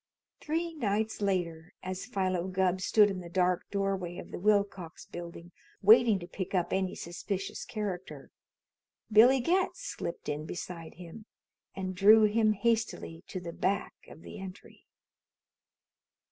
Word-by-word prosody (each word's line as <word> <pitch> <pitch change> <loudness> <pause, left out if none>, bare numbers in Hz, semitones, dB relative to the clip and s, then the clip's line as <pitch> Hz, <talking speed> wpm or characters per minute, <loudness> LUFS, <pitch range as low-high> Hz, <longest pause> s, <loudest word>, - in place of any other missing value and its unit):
Three 330 +2 -2
nights 220 -6 -1
later, 175 -4 -2
as 185 +3 -5
Philo 185 -5 -1
Gubb 185 0 +1
stood 205 +2 +5
in 190 - -4
the 175 -1 -9
dark 180 0 +1
doorway 195 -3 -2
of - - -9
the - - -5
Willcox 200 -4 0
Building 170 0 -9 0.3
waiting 220 +1 +7
to 175 -2 -8
pick 190 +1 -5
up 180 -2 0
any 190 -1 0
suspicious 185 +3 -4
character, 195 -5 -5 0.8
Billy 240 +5 +7
Getz 370 - +1
slipped 170 - -5
in 150 +1 -3
beside 170 -1 -7
him 180 +6 -11 0.5
and 185 -1 -3
drew 210 +4 +7
him 215 0 +3
hastily 220 -6 -1
to 185 - -5
the 170 -2 -7
back 200 +3 -1 0.2
of 160 - -13
the 215 - -9
entry. 190 0 -11
190 Hz, 140 wpm, -30 LUFS, 175-215 Hz, 0.8 s, waiting